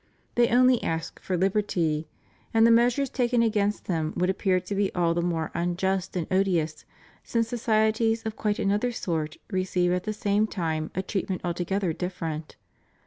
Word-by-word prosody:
They 240 0 +4
only 250 0 +4
ask 165 0 -3
for 185 - -1
liberty, 175 -5 0 0.5
and 225 0 +6
the 230 - +6
measures 245 +4 +4
taken 245 -2 +2
against 210 -2 0
them 160 -3 -1
would 180 +1 +2
appear 190 -1 +1
to 180 +3 -6
be 200 0 +1
all 170 -2 +2
the 170 - 0
more 165 -2 -1
unjust 185 +2 -1
and 175 -3 -1
odious 175 -5 +1 0.4
since 230 -1 0
societies 225 -1 +1
of 220 -1 -3
quite 210 -2 -1
another 205 +5 +1
sort 160 -8 -3
receive 185 -2 +1
at 180 0 -1
the 215 - -1
same 205 +1 +1
time 160 -6 -2
a 190 - -1
treatment 190 -1 -2
altogether 175 +1 -1
different. 165 -3 -5
190 Hz, 165 wpm, -26 LUFS, 170-220 Hz, 0.5 s, and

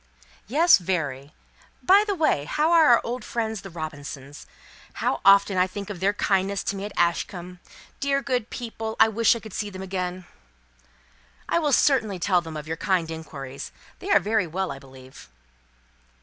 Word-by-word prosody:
"Yes; 310 - +5
very. 145 -6 -3 0.5
By 395 +3 +6
the 405 - 0
way, 305 - +1
how 305 - +1
are 330 -2 +6
our 240 -1 +6
old 245 +2 -4
friends 220 -3 -3
the 195 - -9
Robinsons? 145 -4 -8 0.5
How - - -1
often 200 -1 +5
I 180 - +3
think 200 +2 -7
of 190 - -7
their 195 +3 +2
kindness 195 -1 0
to - - -2
me 195 +1 -5
at 210 - -6
Ashcombe! 175 +1 -1 0.4
Dear 275 -1 +1
good 250 -4 -1
people, 225 -2 -5
I 220 - +7
wish 230 +2 +3
I - - -5
could 220 -3 -11
see 210 - -3
them 190 -1 -8
again." 185 -1 -4 1.2
"I - - +2
will 300 -3 0
certainly 235 -8 +3
tell 180 0 +2
them 160 -2 -7
of 150 0 -8
your 160 +1 -3
kind 180 -5 0
inquiries. 140 -4 -8 0.3
They 385 - -7
are - - +6
very 215 -3 0
well, 185 +4 -3
I 135 - -7
believe." 130 - -15
195 Hz, 175 wpm, -25 LUFS, 165-225 Hz, 1.2 s, I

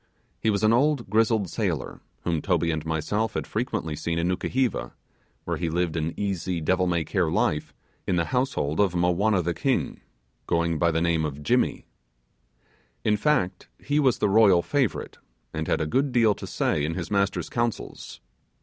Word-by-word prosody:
He 110 - +1
was 100 0 0
an 110 +1 +5
old 135 -4 +1
grizzled 110 -2 +2
sailor, - - -3 0.2
whom 85 -3 0
Toby 85 -3 +1
and 80 -1 -2
myself 105 +8 -1
had - - -2
frequently 110 - -2
seen 85 +2 -2
in 85 +1 0
Nukuheva, 125 +7 -1 0.5
where - - -2
he 85 - -2
lived 85 -1 -1
an 80 0 -2
easy 95 -3 -2
devil 90 +3 +1
may 85 -2 +1
care - - 0
life 75 - 0 0.4
in 90 - +1
the 85 -1 +1
household 125 - 0
of 95 -4 +2
Mowanna 90 +3 +2
the 85 +1 -1
king, 130 - -1 0.5
going 85 -1 +1
by 85 - +3
the 80 0 0
name 85 -2 +1
of 75 -1 -4
'Jimmy'. - - +1 1.2
In 105 - +3
fact 105 -7 0
he 145 +1 0
was 130 -5 +3
the - - +1
royal 100 -4 +5
favourite, 140 -6 -1 0.3
and 80 0 -3
had - - +1
a 80 - 0
good 135 - +1
deal 115 -4 +4
to - - -8
say 75 - 0
in 80 +2 -1
his 90 0 -5
master's 100 -1 0
councils. 120 -2 -3
90 Hz, 175 wpm, -25 LUFS, 85-110 Hz, 1.2 s, an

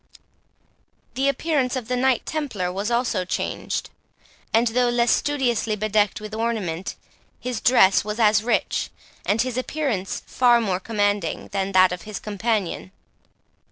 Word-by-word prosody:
The 270 +2 +1
appearance 275 -2 0
of 250 -4 -4
the 250 - 0
Knight 255 0 +1
Templar 240 - -2
was 200 +4 -2
also 235 -5 0
changed; 180 - -3 0.6
and, 225 +2 +3
though 245 +1 +2
less 240 0 +2
studiously 250 -7 +1
bedecked 210 -1 +1
with 215 0 -8
ornament, 215 -6 -2 0.4
his 250 -3 -4
dress 220 -6 +5
was 210 +2 -4
as 210 -2 +4
rich, 240 - 0 0.4
and 215 +3 +3
his 255 -1 -2
appearance 255 -9 -2
far 240 -2 +4
more 195 -5 -1
commanding, 205 -4 -1
than 195 0 -2
that 185 -1 +6
of 180 -1 -4
his 210 -2 -6
companion. 210 -3 -2
220 Hz, 140 wpm, -23 LUFS, 200-250 Hz, 0.6 s, that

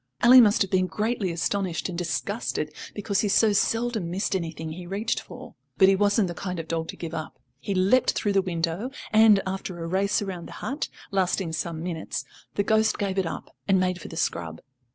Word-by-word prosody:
Ally 250 +2 +9
must 215 -3 +5
have 195 - -7
been 185 -1 +2
greatly 215 -2 -1
astonished 175 +1 -1
and 180 - -5
disgusted, 150 -4 -2 0.2
because 200 -1 -1
he 210 - +2
so 210 +1 +4
seldom 225 -3 0
missed 190 +2 -1
anything 160 -3 -4
he 175 +2 -8
reached 205 +5 -1
for. - - -11 0.2
But 190 -1 +7
he 195 - +5
wasn't 205 +1 +2
the 175 - -4
kind 180 0 -4
of 165 - -6
dog 165 0 -2
to - - -6
give 165 -1 -6
up. 160 -1 -5 0.2
He 195 +6 -3
leapt 195 +8 +3
through 205 - 0
the 195 - +4
window, 175 +4 -2 0.2
and, 215 -2 +6
after 190 -1 -4
a 165 - -5
race 195 +3 +1
round 185 -4 -6
the - - -10
hut, 280 +3 -4 0.2
lasting 185 -3 0
some 165 0 -3
minutes, 170 -2 -4 0.3
the 200 - +2
ghost 220 +1 +2
gave 195 -2 -1
it 185 - 0
up, - - -7
and 195 -2 +4
made 185 0 0
for - - -8
the 165 - -8
scrub. 85 - -2
190 Hz, 210 wpm, -26 LUFS, 170-205 Hz, 0.3 s, Ally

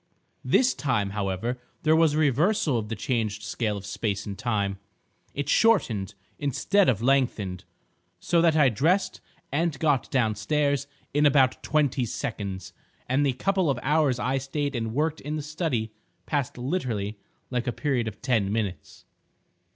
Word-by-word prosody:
This 255 0 +3
time, 115 -9 -1
however, 105 +5 -2 0.2
there 155 0 +4
was 160 -2 +4
a - - 0
reversal 155 - +2
of 105 -1 -6
the 115 - -2
changed 110 -2 -2
scale 105 -2 -2
of 100 - -8
space 100 0 -2
and 100 -2 -5
time; 100 -4 -1 0.6
it 145 -1 -2
shortened 135 - +2 0.2
instead 180 +8 +2
of 115 -3 0
lengthened, 120 -9 +1 0.5
so 170 -1 +2
that 165 -2 +4
I 150 -4 +5
dressed 160 - +1 0.3
and 155 +1 0
got 145 -3 +1
downstairs 135 +4 +1 0.3
in 145 +1 +4
about 135 -2 +3
twenty 145 -4 +1
seconds, 100 -3 -5 0.3
and 130 +3 +2
the 135 -2 +2
couple 190 +4 +1
of 135 - +1
hours 145 -3 +2
I 130 +2 0
stayed 140 +1 -3
and 115 -1 -3
worked 155 +2 0
in 150 +2 -4
the 150 - -3
study 150 -8 -2 0.3
passed 145 -5 -2
literally 120 - -2 0.3
like 125 0 -1
a - - +2
period 125 -3 -1
of 105 -1 -8
ten 110 -7 +1
minutes." 105 -4 -4
130 Hz, 155 wpm, -26 LUFS, 110-150 Hz, 0.6 s, I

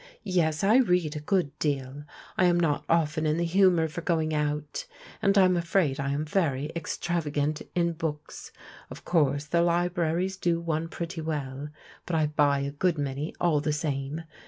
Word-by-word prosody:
" - - -43
Yes, 170 -5 0
I 215 +5 +5
read 180 - +2
a - - -3
good 170 -1 0
deal, 140 -1 -2 0.3
I 185 - +3
am 175 -1 +4
not 155 -4 +1
often 155 -1 +2
in 155 +1 +1
the 170 - 0
humour 175 -2 +4
for 160 +2 -6
going 160 -2 0
out, 150 -1 -2 0.3
and 200 0 +3
I'm 185 -2 +5
afraid 170 -4 +1
I 140 0 -1
am 145 +2 -1
very 150 -4 0
extrav 170 0 -2
agant 150 +1 -1
in 170 -1 +1
books. 155 -2 -5 0.4
Of - - -11
course 145 -4 +2
the 170 +3 +1
libraries 175 +1 0
do 170 -3 +1
one 165 -1 -2
pretty 170 0 -5
well, 145 -2 -4 0.4
but 175 - -1
I 155 -1 +3
buy^a 145 -2 +1
good 175 +2 +1
many 145 +2 -3
all 160 -4 +2
the 150 0 0
same. 150 0 -3
160 Hz, 180 wpm, -27 LUFS, 150-175 Hz, 0.4 s, I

